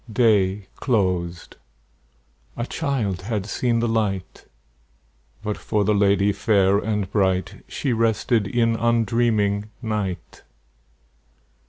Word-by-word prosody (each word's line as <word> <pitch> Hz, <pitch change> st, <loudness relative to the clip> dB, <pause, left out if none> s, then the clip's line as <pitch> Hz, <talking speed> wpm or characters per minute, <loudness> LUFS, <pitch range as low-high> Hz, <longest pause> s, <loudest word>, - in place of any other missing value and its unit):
Day 105 Hz, -3 st, +2 dB
closed; 90 Hz, -8 st, -1 dB, 1.0 s
a 120 Hz, -, -2 dB
child 125 Hz, -, -2 dB
had 105 Hz, 0 st, -3 dB
seen 115 Hz, +2 st, 0 dB
the 120 Hz, -, +1 dB
light; 105 Hz, -5 st, -2 dB, 1.0 s
But, 105 Hz, -1 st, -2 dB
for 105 Hz, -2 st, -1 dB
the 105 Hz, -, +2 dB
lady 100 Hz, 0 st, +3 dB
fair 100 Hz, -1 st, +3 dB
and 105 Hz, -2 st, -1 dB
bright, 95 Hz, -3 st, 0 dB
She 135 Hz, -4 st, -2 dB
rested 115 Hz, -1 st, +1 dB
in 115 Hz, +2 st, +1 dB
undreaming 115 Hz, -3 st, +1 dB
night. 105 Hz, -7 st, -4 dB
105 Hz, 105 wpm, -23 LUFS, 100-115 Hz, 1.0 s, lady